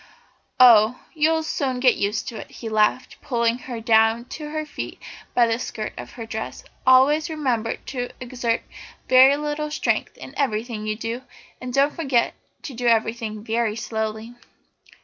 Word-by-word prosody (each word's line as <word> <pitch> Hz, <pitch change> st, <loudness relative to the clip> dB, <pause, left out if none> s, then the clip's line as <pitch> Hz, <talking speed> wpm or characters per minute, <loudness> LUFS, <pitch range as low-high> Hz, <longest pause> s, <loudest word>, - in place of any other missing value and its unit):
"Oh, 235 Hz, -1 st, +7 dB
you'll 320 Hz, +1 st, +2 dB
soon 265 Hz, -5 st, -2 dB
get 250 Hz, -1 st, +5 dB
used 205 Hz, +2 st, -1 dB
to 230 Hz, -, -8 dB
it," -, -, -8 dB
he 225 Hz, -, -7 dB
laughed, 215 Hz, +3 st, +1 dB
pulling 235 Hz, -1 st, 0 dB
her 240 Hz, -2 st, -4 dB
down 225 Hz, -1 st, +4 dB
on 235 Hz, -, -11 dB
to 300 Hz, -1 st, -6 dB
her 310 Hz, 0 st, -3 dB
feet -, -, -7 dB, 0.4 s
by 240 Hz, -, +5 dB
the 230 Hz, 0 st, 0 dB
skirt 215 Hz, -3 st, -5 dB
of -, -, -9 dB
her 230 Hz, -2 st, -7 dB
dress; 220 Hz, 0 st, -6 dB, 0.2 s
"always 275 Hz, +5 st, +5 dB
remember 255 Hz, -8 st, -1 dB
to 245 Hz, -2 st, -5 dB
exert 240 Hz, -2 st, -2 dB, 0.4 s
very 260 Hz, +2 st, +7 dB
little 300 Hz, 0 st, -3 dB
strength 300 Hz, -, -1 dB
in -, -, -10 dB
everything 220 Hz, -4 st, -2 dB
you 215 Hz, -, -1 dB
do, 230 Hz, +3 st, -4 dB, 0.4 s
and 255 Hz, -, -5 dB
don't 280 Hz, +3 st, +2 dB
forget 265 Hz, -7 st, +1 dB, 0.3 s
to 280 Hz, -, -6 dB
do 245 Hz, 0 st, -2 dB
everything 225 Hz, -2 st, 0 dB
very 225 Hz, -1 st, 0 dB
slowly." 220 Hz, 0 st, -4 dB
240 Hz, 165 wpm, -23 LUFS, 225-270 Hz, 0.4 s, Oh